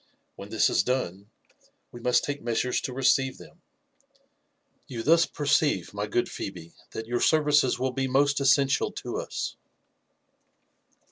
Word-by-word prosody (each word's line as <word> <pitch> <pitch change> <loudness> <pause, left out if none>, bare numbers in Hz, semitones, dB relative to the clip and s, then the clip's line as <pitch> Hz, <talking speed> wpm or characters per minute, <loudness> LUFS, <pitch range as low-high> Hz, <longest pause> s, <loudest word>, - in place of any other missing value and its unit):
When 100 - -10
this 110 0 +3
is - - +2
done, 100 -6 -3 0.6
we 120 - -10
must 125 +1 +2
take 145 0 -4
measures 120 +2 -1
to - - -4
receive 130 0 +2
them. - - -16 1.3
You 115 -3 -5
thus 165 +3 +4
per 145 - -6
ceive, 145 - +2
my 105 +1 -3
good 120 +3 0
Phebe, 85 -4 -7 0.2
that 110 - -6
your 120 +1 -1
services 150 -5 +3
will 130 +1 -1
be 135 +1 -2
most 140 +2 +2
essentia 135 0 +3
to - - -5
us." - - -4
130 Hz, 145 wpm, -27 LUFS, 115-140 Hz, 1.3 s, thus